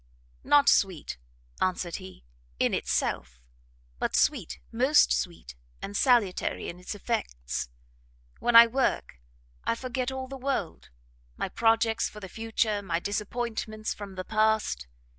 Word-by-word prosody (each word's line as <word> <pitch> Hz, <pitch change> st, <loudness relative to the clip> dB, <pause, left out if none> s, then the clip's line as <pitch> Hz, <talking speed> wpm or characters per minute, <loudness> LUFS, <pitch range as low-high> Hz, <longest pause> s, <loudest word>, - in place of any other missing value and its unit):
"Not 290 Hz, -1 st, +5 dB
sweet," 180 Hz, -, +2 dB, 0.4 s
answered 180 Hz, -2 st, 0 dB
he, 185 Hz, -, -12 dB, 0.3 s
"in -, -, +1 dB
itself; 60 Hz, +1 st, -1 dB, 0.6 s
but -, -, -1 dB
sweet, -, -, +1 dB
most 265 Hz, +6 st, +4 dB
sweet 170 Hz, -, -3 dB, 0.3 s
and 200 Hz, -, -6 dB
salutary 235 Hz, -6 st, +2 dB
in 175 Hz, -, -8 dB
its 180 Hz, +3 st, -6 dB
effects. 65 Hz, -, -3 dB, 0.7 s
When 240 Hz, -, +1 dB
I 230 Hz, 0 st, +12 dB
work, 235 Hz, -, -1 dB, 0.4 s
I -, -, 0 dB
forget 255 Hz, +1 st, -3 dB
all 265 Hz, 0 st, -5 dB
the 270 Hz, +1 st, -7 dB
world; 265 Hz, -10 st, -3 dB, 0.5 s
my -, -, -2 dB
projects 225 Hz, 0 st, +2 dB
for 210 Hz, -, -11 dB
the 195 Hz, -, -8 dB
future, 225 Hz, -1 st, -1 dB
my 170 Hz, -4 st, -1 dB
disappointments 215 Hz, +2 st, -3 dB
from 200 Hz, -2 st, -9 dB
the 185 Hz, -, -4 dB
past. 220 Hz, -, +1 dB
220 Hz, 130 wpm, -28 LUFS, 185-240 Hz, 0.7 s, I